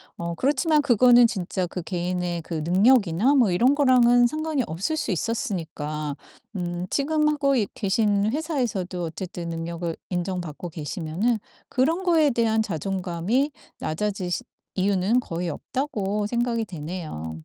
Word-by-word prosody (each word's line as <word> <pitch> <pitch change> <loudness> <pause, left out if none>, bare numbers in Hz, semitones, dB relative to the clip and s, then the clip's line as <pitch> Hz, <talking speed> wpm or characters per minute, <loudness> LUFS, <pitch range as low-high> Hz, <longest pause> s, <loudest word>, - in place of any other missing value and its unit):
어 170 0 -4
그렇지만 295 - +2
그거는 245 -2 +6
진짜 185 -4 -2
그 180 - -5
개인의 175 -1 -2
그 170 - -7
능력이나 205 - +4
뭐 235 -8 +4
이런 250 +10 +4
거랑은 245 -3 +5
상관이 310 -2 -1
없을 190 - -2
수 265 - -2
있었으니까 160 - -3 0.4
음 175 -1 -3
지금 300 +2 +1
하고 280 -3 +2
있 205 -4 0
계신 205 0 +1
회사에서도 240 - -2
어쨌든 170 0 -5
능력을 165 0 -3 0.2
인정받고 175 -2 -3
계시면은 165 +8 -2 0.3
그런 325 +9 +1
거에 325 -5 +4
대한 225 -2 +2
자존감이 195 - -1 0.3
낮아지시 185 +2 -2 0.3
이유는 195 +4 +2
거의 170 -5 -3
없다고 210 - -2
생각이 235 0 0
되네요. 155 - -6
200 Hz, 315 characters per minute, -25 LUFS, 175-250 Hz, 0.4 s, 그거는